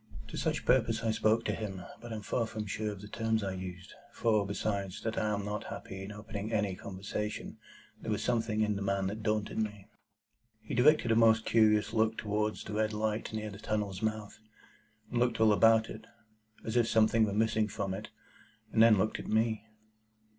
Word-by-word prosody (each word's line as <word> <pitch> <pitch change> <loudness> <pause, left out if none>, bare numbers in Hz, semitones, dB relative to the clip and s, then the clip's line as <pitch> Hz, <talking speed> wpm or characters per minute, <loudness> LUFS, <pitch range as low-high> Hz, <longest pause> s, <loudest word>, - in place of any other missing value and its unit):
To - - -7
such - - -1
purpose 115 -3 +3
I 115 - +2
spoke 110 +1 +2
to - - +1
him; 95 -4 -5 0.2
but 120 0 -8
I - - -3
am 105 - -6
far 115 +2 -1
from 110 -1 -5
sure 105 +1 -2
of 100 -2 -9
the 105 - -9
terms 110 0 -1
I 95 -1 -2
used; 95 +1 -7 0.2
for, 110 -3 +1
besides 100 -2 -2
that 110 0 -2
I 110 - 0
am 100 -1 -2
not 105 0 -3
happy 95 0 -7
in 95 +2 -7
opening 105 0 -6
any 105 -3 +1
conversation, 100 +3 -5 0.4
there - - -5
was - - -1
something 115 -3 0
in 105 -1 +1
the 100 - -4
man 100 -1 0
that 105 +3 -3
daunted 105 0 -1
me. 105 -2 -3 0.7
He 110 - -8
directed 125 -1 +4
a - - +4
most 110 -1 +5
curious 105 -1 +3
look 110 0 +2
towards 105 0 -1
the 105 - -7
red 110 0 0
light 110 +1 -1
near 110 -1 -4
the 100 - -10
tunnel's 105 -3 -2
mouth, 110 -1 -3 0.7
and 120 - 0
looked 120 -2 +1
all 110 -1 +6
about 115 +1 +5
it, 110 0 -9 0.6
as 110 - -3
if 120 -2 +4
something 110 0 +4
were 105 - +1
missing 110 +1 +2
from 95 -2 -3
it, 100 +3 -6 0.6
and 110 - +4
then 115 -2 +7
looked 110 +3 0
at - - -7
me. 110 0 +1
110 Hz, 205 wpm, -31 LUFS, 105-110 Hz, 0.7 s, then